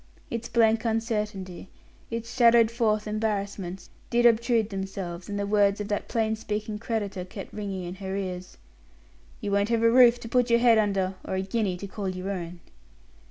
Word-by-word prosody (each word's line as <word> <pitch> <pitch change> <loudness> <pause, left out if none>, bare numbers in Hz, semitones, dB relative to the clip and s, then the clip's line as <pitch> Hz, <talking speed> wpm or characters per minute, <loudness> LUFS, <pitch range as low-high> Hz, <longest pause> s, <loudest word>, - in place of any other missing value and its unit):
Its 230 0 -4
blank 225 -1 +3
uncertainty, 210 -5 -2 0.4
its 230 0 -5
shadowed 235 -2 +6
forth 215 -3 +1
embarrassments 200 -4 -3 0.2
did 240 0 +2
obtrude 230 -1 +3
themselves 190 -2 -5
and 205 - -3
the 200 - -1
words 200 0 +3
of 205 - -4
that 205 - -2
plain 220 -1 0
speaking 215 -1 -4
creditor 205 -5 -3
kept 190 +2 -9
ringing 195 -3 -4
in 175 0 -5
her 190 0 -5
ears: 185 -2 -5 0.8
"You 205 - -3
won't 200 +1 +2
have 230 -1 +1
a 230 - +5
roof 245 -1 +6
to 230 - -7
put 245 +1 +2
your 235 - +5
head 235 -2 +5
under, 195 -3 +1
or - - -3
a 190 - -1
guinea 195 -2 -1
to 200 - -7
call 200 0 -4
your 185 +1 -4
own." 175 -2 -6
210 Hz, 180 wpm, -27 LUFS, 195-230 Hz, 0.8 s, shadowed